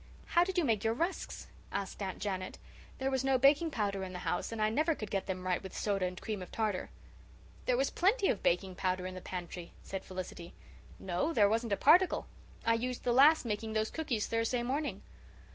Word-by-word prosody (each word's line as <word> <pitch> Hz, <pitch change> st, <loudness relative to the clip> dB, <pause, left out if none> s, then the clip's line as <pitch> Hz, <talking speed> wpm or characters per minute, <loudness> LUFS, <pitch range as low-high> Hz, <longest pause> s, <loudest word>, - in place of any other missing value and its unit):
"How 345 Hz, -, +5 dB
did 375 Hz, +1 st, -3 dB
you 345 Hz, -, +3 dB
make 220 Hz, -5 st, +1 dB
your 225 Hz, 0 st, +1 dB
rusks?" 340 Hz, +8 st, -2 dB, 0.3 s
asked 200 Hz, 0 st, -4 dB
Aunt 190 Hz, -2 st, -3 dB
Janet. 190 Hz, -2 st, -3 dB, 0.4 s
"There 265 Hz, 0 st, -1 dB
was 265 Hz, -1 st, 0 dB
no 270 Hz, -1 st, +3 dB
baking 285 Hz, +5 st, +5 dB
powder 200 Hz, -7 st, -1 dB
in 185 Hz, -1 st, -6 dB
the -, -, -4 dB
house, 175 Hz, -, -1 dB
and 225 Hz, -, -5 dB
I 215 Hz, -, +3 dB
never 310 Hz, +6 st, +2 dB
could 215 Hz, -6 st, -6 dB
get 195 Hz, -1 st, -1 dB
them 185 Hz, -1 st, -3 dB
right 180 Hz, -1 st, +1 dB
with 190 Hz, -, -8 dB
soda 195 Hz, -3 st, 0 dB
and 180 Hz, 0 st, -6 dB
cream 215 Hz, -4 st, -4 dB
of 180 Hz, -, -8 dB
tartar." 215 Hz, -4 st, -1 dB, 0.8 s
"There -, -, +3 dB
was -, -, +1 dB
plenty 395 Hz, +3 st, +3 dB
of 205 Hz, -, +1 dB
baking 185 Hz, +2 st, +1 dB
powder 185 Hz, 0 st, -1 dB
in 185 Hz, -, -4 dB
the 185 Hz, -, -7 dB
pantry," 175 Hz, -1 st, -6 dB
said 195 Hz, -1 st, -5 dB
Felicity. 180 Hz, -2 st, -7 dB, 0.4 s
"No, 190 Hz, -, -1 dB
there 205 Hz, -8 st, +5 dB
wasn't 225 Hz, +1 st, 0 dB
a -, -, +1 dB
particle. 365 Hz, +3 st, +5 dB, 0.4 s
I 230 Hz, -, +4 dB
used 245 Hz, +2 st, -2 dB
the 240 Hz, -, +2 dB
last 285 Hz, +3 st, +6 dB
making 220 Hz, 0 st, -2 dB
those 220 Hz, 0 st, 0 dB
cookies 270 Hz, -10 st, -1 dB
Thursday 230 Hz, +2 st, 0 dB
morning." 285 Hz, +5 st, -2 dB
220 Hz, 210 wpm, -33 LUFS, 190-270 Hz, 0.8 s, last